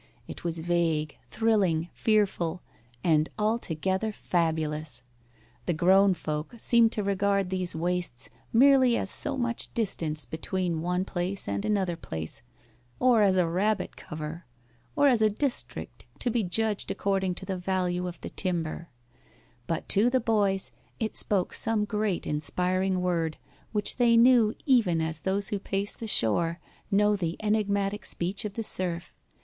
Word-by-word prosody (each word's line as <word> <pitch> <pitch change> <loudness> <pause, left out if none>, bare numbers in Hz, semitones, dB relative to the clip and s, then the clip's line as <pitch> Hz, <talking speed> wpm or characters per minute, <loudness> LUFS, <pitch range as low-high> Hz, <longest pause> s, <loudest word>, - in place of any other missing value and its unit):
It - - -9
was 170 -1 -1
vague, 165 -2 0
thrilling, 195 -7 +1
fearful, 190 -6 +1 0.4
and 155 -2 +3
altogether 210 -2 -1
fabulous. 155 - -1 0.6
The 175 - +1
grown 190 +3 +5
folk 155 +5 -4
seemed 230 0 +4
to 210 - -2
regard 200 -1 +1
these 185 -2 -1
wastes 175 -6 -2 0.2
merely 260 0 +5
as 195 - -2
so 280 -2 0
much 240 -2 -2
distance 160 - -1
between 170 +4 -2
one 180 +2 -1
place 185 +1 -3
and 100 0 -2
another 190 -5 0
place, 80 - -6 0.6
or 250 -3 +5
as 195 -2 +4
a 180 - +4
rabbit 190 +4 0
cover, 155 +3 -7 0.5
or 290 -1 +4
as 245 -5 +4
a 215 - +5
district 250 +5 -3
to 245 - -1
be 230 -1 +1
judged 210 +3 -1
according 195 -2 0
to 190 - -8
the 190 -1 -3
value 180 -1 -1
of 175 - -7
the - - -7
timber; 170 -2 -2 0.8
but 165 - -2
to 215 +5 +4
the 260 +1 +2
boys 205 -4 +1 0.3
it 220 -1 -2
spoke 195 -3 +1
some 220 -2 +1
great 210 -3 -1
inspiring 180 +5 0
word, 165 -3 0 0.3
which 210 -2 +1
they 235 -2 +5
knew 235 -2 +5
even 225 - +3
as 160 -1 -2
those 195 +1 0
who 205 - -2
pace 195 +1 -2
the 225 - -7
shore 165 - +1 0.3
know 210 +1 +3
the 170 -4 -2
enigmatic 205 -1 0
speech 185 +5 -2
of 205 - -4
the 225 - -2
surf. 175 -4 -3
190 Hz, 150 wpm, -28 LUFS, 170-215 Hz, 0.8 s, grown